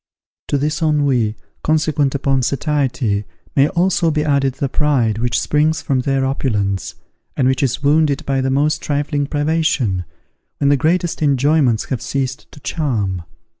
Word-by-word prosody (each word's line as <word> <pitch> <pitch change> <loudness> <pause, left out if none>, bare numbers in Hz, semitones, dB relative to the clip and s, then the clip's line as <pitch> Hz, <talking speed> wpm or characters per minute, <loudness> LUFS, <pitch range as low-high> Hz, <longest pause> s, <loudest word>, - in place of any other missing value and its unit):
To 145 - +1
this 150 +3 -1
ennui, 140 -8 +1 0.3
consequent 155 -3 +1
upon 135 -1 +1
satiety, 130 -6 0 0.3
may 140 +1 +5
also 175 0 +1
be 150 -1 0
added 140 -3 +1
the 140 +1 -1
pride 130 -7 +1
which 120 +1 0
springs 150 0 +1
from 135 -2 0
their 135 +1 0
opulence, 105 - -1 0.4
and 130 - +3
which 130 -1 +1
is 135 +1 -1
wounded 150 +1 +2
by 135 -1 0
the 130 - 0
most 145 +3 +1
trifling 145 0 -1
privation, 145 - 0 0.5
when 140 - +2
the 145 - +5
greatest 170 +5 0
enjoyments 140 -4 +2
have 130 - -2
ceased 130 +1 -3
to - - -13
charm. 110 - -2
140 Hz, 150 wpm, -18 LUFS, 130-150 Hz, 0.5 s, may